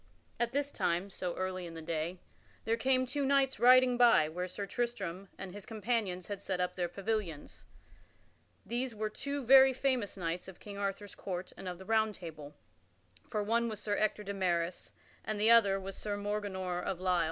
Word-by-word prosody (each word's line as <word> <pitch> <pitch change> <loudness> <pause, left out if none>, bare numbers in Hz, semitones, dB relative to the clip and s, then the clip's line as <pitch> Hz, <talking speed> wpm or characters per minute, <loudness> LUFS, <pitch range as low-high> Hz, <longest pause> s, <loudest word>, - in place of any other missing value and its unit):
At 235 0 +1
this 285 +1 -1
time, 175 +4 -1
so 180 -2 -3
early 185 -1 -3
in 165 - -9
the 165 - -6
day, 165 +2 -2 0.5
there 225 +1 +2
came 255 +2 +2
two 280 +3 -2
knights 270 -1 +2
riding 250 0 +6
by 235 -11 +6
where 180 +3 -3
Sir 200 +3 -5
Tristram 200 -6 -3
and 190 -1 -7
his 205 0 -7
companions 215 -5 -2
had 200 -1 -5
set 190 -2 -2
up 180 0 0
their 175 -1 0
pavilions. 195 -5 -4 1.0
These 240 0 -2
were 215 0 -2
two 280 +3 -4
very 265 +1 +8
famous 255 -6 0
knights 170 -1 -3
of 190 - -11
King 200 -1 -8
Arthur's 200 0 -3
court 180 -1 -5
and 190 - -8
of 180 -1 -4
the 190 - -11
Round 220 -1 +2
Table; 155 -5 -9 0.7
for 210 -1 -1
one 235 +2 +1
was 215 -2 -5
Sir 205 -1 -1
Ector 210 0 0
de 200 0 -4
Maris 175 -2 -1 0.3
and 215 -1 -3
the 220 +2 +5
other 200 -4 +6
was 195 0 -6
Sir 205 -1 -3
Morganor 200 -3 -2
of 185 - -2
Lisle. 180 -1 +2
200 Hz, 190 wpm, -33 LUFS, 180-235 Hz, 1.0 s, very